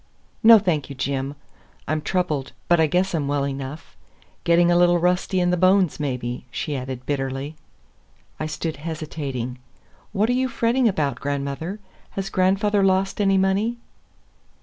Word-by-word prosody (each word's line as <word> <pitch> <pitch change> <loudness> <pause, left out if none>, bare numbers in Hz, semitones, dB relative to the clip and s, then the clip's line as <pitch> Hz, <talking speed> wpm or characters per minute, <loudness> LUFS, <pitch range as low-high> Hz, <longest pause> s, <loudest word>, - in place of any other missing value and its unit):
"No, 230 0 +9
thank 175 -9 0
you, 140 - -7
Jim. 135 +1 -2 0.5
I'm 155 0 0
troubled, 155 -7 -1
but 175 -1 +4
I 160 - +4
guess 180 +4 +1
I'm 150 -4 -1
well 140 -1 0
enough. 135 - -6 0.5
Getting 170 +1 +4
a - - +4
little 175 0 +5
rusty 180 +2 +1
in 175 0 +2
the 180 - +1
bones, 185 -2 +3
maybe," 125 -4 -3
she 145 +4 -3
added 130 -1 -5
bitterly. 135 +1 -3 0.8
I 155 - -2
stood 155 0 -4
hesitating. 145 -6 -5 0.5
"What 210 +1 +1
are - - +2
you 260 +1 +1
fretting 240 +1 +2
about, 145 - 0
grandmother? 145 +7 -3 0.4
Has 195 0 -3
grandfather 195 +2 +2
lost 195 +1 +1
any 195 -1 +3
money?" 195 +5 +1
165 Hz, 150 wpm, -23 LUFS, 140-190 Hz, 0.8 s, No